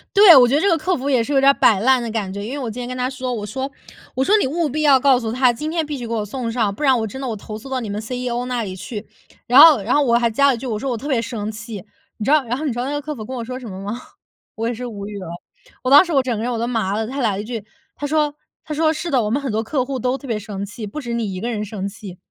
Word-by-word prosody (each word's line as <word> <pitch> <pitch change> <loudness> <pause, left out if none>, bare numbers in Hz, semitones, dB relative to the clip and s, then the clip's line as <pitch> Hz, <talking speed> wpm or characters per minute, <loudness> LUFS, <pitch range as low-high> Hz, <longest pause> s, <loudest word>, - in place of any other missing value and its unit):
对， 395 -4 +9
我 255 -2 +8
觉 245 - 0
得 - - +3
这 400 - +2
个 335 - +3
客 360 +3 0
服 275 +2 -3
也 255 -4 +3
是 280 - -5
有 275 - +4
点 275 +1 +6
儿 - - +6
摆 215 -7 +4
烂 255 +4 +3
的 230 - -4
感 205 -4 -3
觉， 200 +1 -5
因 230 - -5
为 285 - -4
我 250 -4 -3
今 245 +3 -6
天 245 - -5
跟 255 - -5
他 250 0 -1
说， 255 -1 -4
我 215 -3 -4
说 265 +6 -4 0.4
我 260 - -2
说： 405 +10 +4
“你 - - +1
务 315 +4 0
必 305 +3 -2
要 280 -3 +6
告 265 -1 +4
诉 225 -3 -3
他 250 0 +3
今 300 +7 -4
天 325 -1 0
必 295 -1 -4
须 245 - -6
给 230 - -4
我 215 -2 -1
送 235 +2 -4
上， 225 -4 0
不 300 - -6
然 265 -3 +4
我 220 - -2
真 265 +6 -8
的 - - -4
我 235 - -2
投 215 +1 -8
诉 245 +5 -11
到 265 -1 -1
你 225 -4 -5
们 200 - -3
CEO 245 +1 -3
那 250 -2 -2
里 190 -3 -5
去。 205 +3 -7 0.4
“然 245 - +4
后 310 -9 +8
然 220 - 0
后 295 - +4
我 235 -3 +3
还 235 -1 +2
加 280 +6 +3
了 270 - +3
一 - - -7
句， 255 +2 -6
我 220 - -2
说：” 265 +4 -3
我 240 - -2
特 270 - -7
别 260 -6 +1
生 215 -2 -4
气。 215 -2 -7 0.4
“你 210 - -3
知 275 - +2
道， 305 -3 +5
然 245 +1 -3
后 310 - -4
你 275 - 0
知 - - -8
道 - - -1
那 275 - -3
个 290 0 -2
客 300 +1 -5
服 220 - -7
跟 255 - -7
我 240 -3 -4
说 255 +2 -5
什 250 -3 -8
么 190 0 -7
吗？ 205 +4 -4 0.6
我 225 +1 -2
也 240 - -1
是 245 +2 -6
无 205 -4 -6
语 205 -1 -7
了， 190 - -7 0.6
我 255 - 0
当 285 +4 +9
时 345 - -6
我 275 - +4
整 255 -2 -2
个 220 - -3
人 245 - -1
我 235 - -2
都 235 - -1
麻 220 -5 -1
了， 220 +1 -1
他 270 +3 -4
来 225 -4 +2
了 195 - -3
一 - - -8
句， 230 -2 -5 0.3
他 290 - -5
说 300 0 +1 0.3
他 305 - -4
说： 315 +1 +2
“是 320 +2 -4
的， 260 -6 +2
我 210 - -1
们 265 +6 0
很 275 - -3
多 220 +1 -1
客 255 +2 -1
户 270 0 -3
都 255 +2 -1
特 275 - -11
别 225 -3 -1
生 205 -2 -6
气， 215 +2 -8
不 210 +9 -6
止 240 -4 -5
你 225 -4 -2
一 185 - -5
个 235 +5 -3
人 210 -3 -2
生 200 -2 -5
气。” 195 -3 -9
245 Hz, 385 characters per minute, -20 LUFS, 220-275 Hz, 0.6 s, 对